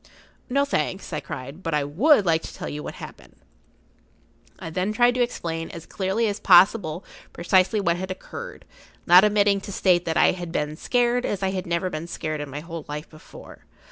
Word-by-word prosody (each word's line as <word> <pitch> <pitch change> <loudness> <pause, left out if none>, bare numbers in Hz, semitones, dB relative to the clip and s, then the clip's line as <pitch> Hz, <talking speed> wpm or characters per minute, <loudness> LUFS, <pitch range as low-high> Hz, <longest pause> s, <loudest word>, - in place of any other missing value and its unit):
"No, 280 +2 +2
thanks," 195 -10 -3
I 155 - -1
cried. 140 +6 -8
"But 165 -4 -2
I 150 - +1
would 205 - +3
like 165 -2 +2
to - - -9
tell - - -6
you 150 - -5
what - - -7
happened."[Pg - - -12 1.2
49] - - -8
I - - -4
then 185 +5 -1
tried 240 +2 +4
to 250 - -1
explain 165 -9 -3
as 170 -2 -9
clearly 195 +4 -1
as 205 0 -3
possible 180 -2 +4 0.3
precisely 185 +4 +2
what 175 -3 +1
had 190 +1 -5
occurred, 470 - -8 0.4
not 180 +2 +8
omitting 205 -1 +3
to 200 - -8
state 180 -2 +2
that 160 - -1
I - - +5
had 175 -2 -6
been 150 -2 -2
scared 245 +6 +1
as 200 -4 -3
I 190 - +1
had 185 -1 -4
never 170 +2 -1
been 155 +1 -5
scared 155 -3 -4
in 145 - -6
my 145 +2 -6
whole 165 -1 -7
life 150 +1 -7
before. 155 - -14
180 Hz, 205 wpm, -24 LUFS, 165-205 Hz, 1.2 s, not